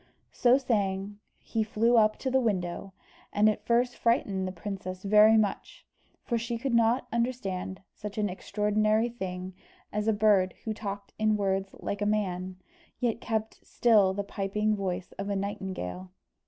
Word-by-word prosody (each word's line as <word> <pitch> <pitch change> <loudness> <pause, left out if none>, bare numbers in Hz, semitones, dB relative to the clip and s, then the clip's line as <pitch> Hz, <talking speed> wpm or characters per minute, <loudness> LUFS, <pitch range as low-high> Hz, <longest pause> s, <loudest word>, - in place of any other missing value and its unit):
So 250 +1 +4
saying 205 -5 -1 0.2
he 225 - -3
flew 225 +2 +2
up 215 -1 +4
to 260 - -3
the 265 - +4
window, 195 -4 -2 0.4
and 210 +1 +3
at 215 - 0
first 245 +1 +2
frightened 195 -5 +1
the - - -3
princess 185 0 -6
very 210 +2 +6
much, 210 -2 -2 0.4
for 235 -2 -1
she 235 +1 -3
could 250 +2 -2
not 235 +2 +3
understand 200 -6 -2
such 210 0 -8
an 210 -1 +1
extraordinary 215 +3 +1
thing 185 -5 -5 0.4
as 210 +1 -1
a - - +5
bird 205 -3 +3
who 220 - -1
talked 200 -2 -6
in 215 -1 +3
words 195 -1 -1
like 205 - -4
a 205 - +1
man, 185 -3 -1 0.4
yet 235 -2 -1
kept 220 -1 -3
still 205 -5 +3
the 200 - -2
piping 210 +2 -1
voice 185 -2 -3
of 200 +1 -3
a 200 - 0
nightingale. 185 - -4
210 Hz, 160 wpm, -28 LUFS, 190-225 Hz, 0.4 s, very